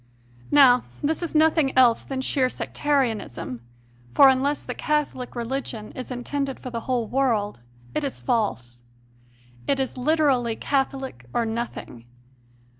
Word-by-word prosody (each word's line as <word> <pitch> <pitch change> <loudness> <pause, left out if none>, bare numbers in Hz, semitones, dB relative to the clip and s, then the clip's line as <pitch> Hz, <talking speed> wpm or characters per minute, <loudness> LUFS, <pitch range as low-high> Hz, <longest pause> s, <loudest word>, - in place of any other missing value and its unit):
Now 260 -4 +6 0.2
this 315 +4 0
is 340 -2 -4
nothing 310 -3 +3
else 245 -3 +5
than 265 -1 -4
sheer 260 -1 +1
Sectarianism; 235 - -2 0.5
for 275 - +8
unless 275 +2 +1
the - - -5
Catholic 300 -5 -2
Religion 235 -3 -4
is 255 - -7
intended 270 +2 -3
for 255 - -7
the 230 - -3
whole 245 -3 +1
world, 225 - 0 0.3
it 305 - -1
is 275 - -3
false. 130 - -2 0.9
It 275 - +1
is 265 -1 -2
literally 260 -5 +2
Catholic, 270 - -2
or 235 - +2
nothing. 225 - -5
260 Hz, 130 wpm, -24 LUFS, 235-280 Hz, 0.9 s, for